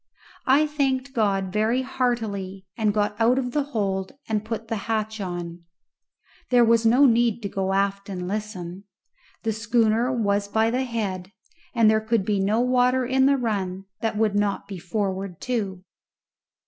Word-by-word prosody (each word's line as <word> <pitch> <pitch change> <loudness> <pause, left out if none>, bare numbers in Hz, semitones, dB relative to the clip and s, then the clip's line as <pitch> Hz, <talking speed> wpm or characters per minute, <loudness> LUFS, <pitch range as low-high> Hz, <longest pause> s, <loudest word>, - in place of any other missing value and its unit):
I 280 +4 +5
thanked 275 -3 -1
God 195 -5 0
very 225 +5 +1
heartily, 215 -7 -2
and 220 -3 +1
got 210 0 0
out 240 +3 +4
of 250 -2 -1
the 290 +1 0
hold 195 -8 -2
and 215 -1 -1
put 225 0 -5
the 225 - -2
hatch 220 -1 -1
on. 175 -2 -5 0.9
There 245 -1 +5
was 230 0 +4
no 250 +5 +6
need 235 -2 +3
to 200 - -2
go 190 -1 -1
aft 200 +1 0
and 180 -2 -4
listen. 195 -2 -5 0.6
The 225 -1 0
schooner 225 +2 +2
was 205 -4 0
by 220 +2 +2
the 255 +2 0
head, 200 -6 -3 0.4
and 230 -2 +5
there 220 0 +4
could 220 -2 0
be 205 -1 +1
no 210 +4 +2
water 250 0 +3
in 265 +2 +3
the 280 0 +4
run 195 -6 -2
that 225 -2 -2
would 215 -1 +2
not 205 -1 0
be 195 -3 -7
forward 190 -1 -3
too. 200 -7 -3
220 Hz, 165 wpm, -24 LUFS, 195-240 Hz, 0.9 s, no